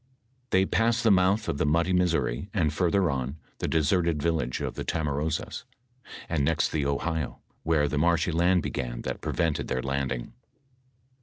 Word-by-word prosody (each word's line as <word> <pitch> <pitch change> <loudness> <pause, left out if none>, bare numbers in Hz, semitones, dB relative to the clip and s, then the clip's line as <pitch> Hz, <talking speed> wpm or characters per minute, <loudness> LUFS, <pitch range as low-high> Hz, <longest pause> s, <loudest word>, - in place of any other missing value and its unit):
They 95 -2 +3
passed 115 +3 +1
the 110 - +5
month 95 +3 +3
of 70 - -2
the - - +2
muddy 85 +4 +2
Missouri, 90 - +1
ajd 80 -6 +2
further 90 +1 +2
on, 65 +2 -3 0.2
the - - -1
deserted 80 0 +1
village 75 -5 -1
of - - -3
the - - -5
Tamaroas, 75 0 -2 0.6
and 80 -4 0
next 80 +2 +2
the 75 -3 0
Ohio, 75 +1 -2 0.2
where 80 -2 +2
the 75 0 -1
marshy 85 +1 +2
land 85 +1 +3
began - - -4
that - - -4
prevented 80 -3 -1
their 65 - -2
landing. 70 - -2
80 Hz, 160 wpm, -27 LUFS, 70-90 Hz, 0.6 s, the